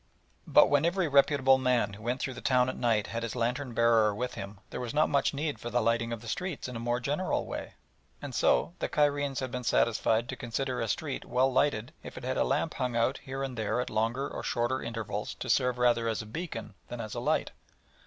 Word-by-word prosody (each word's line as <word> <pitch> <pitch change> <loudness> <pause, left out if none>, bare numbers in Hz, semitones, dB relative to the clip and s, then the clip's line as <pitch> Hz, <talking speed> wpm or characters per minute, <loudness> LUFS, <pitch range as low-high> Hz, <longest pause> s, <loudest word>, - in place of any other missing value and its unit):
But - - +7
when 145 0 +3
every 175 +1 +1
reputable 140 -2 +4
man 125 -5 +1
who 100 - -10
went 120 +3 -1
through 130 - -2
the - - -9
town 125 -1 +3
at - - -4
night 115 -3 +1
had 115 - -4
his 115 0 -4
lantern 125 +1 -1
bearer 115 -3 +4
with 125 +3 -3
him 100 +1 -7
there - - -4
was 125 +1 -4
not 155 +1 +3
much 140 - +2
need 150 +1 -3
for 120 - -5
the 120 +1 +1
lighting 115 0 +1
of 115 -2 -4
the 115 - -10
streets 180 +4 -3
in 125 - -7
a - - -3
more 120 +1 0
general 145 +9 -1
way, - - -6 0.4
and - - -7
so - - +2
the - - -2
Cairenes 145 -2 +1
had 130 -2 -3
been 125 -1 -4
satisfied 115 0 +2
to 130 - -3
consider 125 +1 -3
a 115 - -1
street 155 -3 -2
well 130 +1 +1
lighted 130 -1 +1
if - - -10
it - - -7
had 130 +1 -2
a - - +3
lamp 145 +4 0
hung 125 -2 -2
out 120 +4 +1
here 135 +1 -5
and 135 -2 -4
there 110 +1 -1
at 125 - -2
longer 115 +5 0
or - - -6
shorter 120 +2 -1
intervals 110 -2 -4
to - - -2
serve 125 -2 +2
rather 120 -2 +3
as 110 -2 -1
a - - -11
beacon 115 - -6
than 120 - -7
as 110 -2 -5
a - - -3
light. - - 0
125 Hz, 240 wpm, -30 LUFS, 115-135 Hz, 0.4 s, But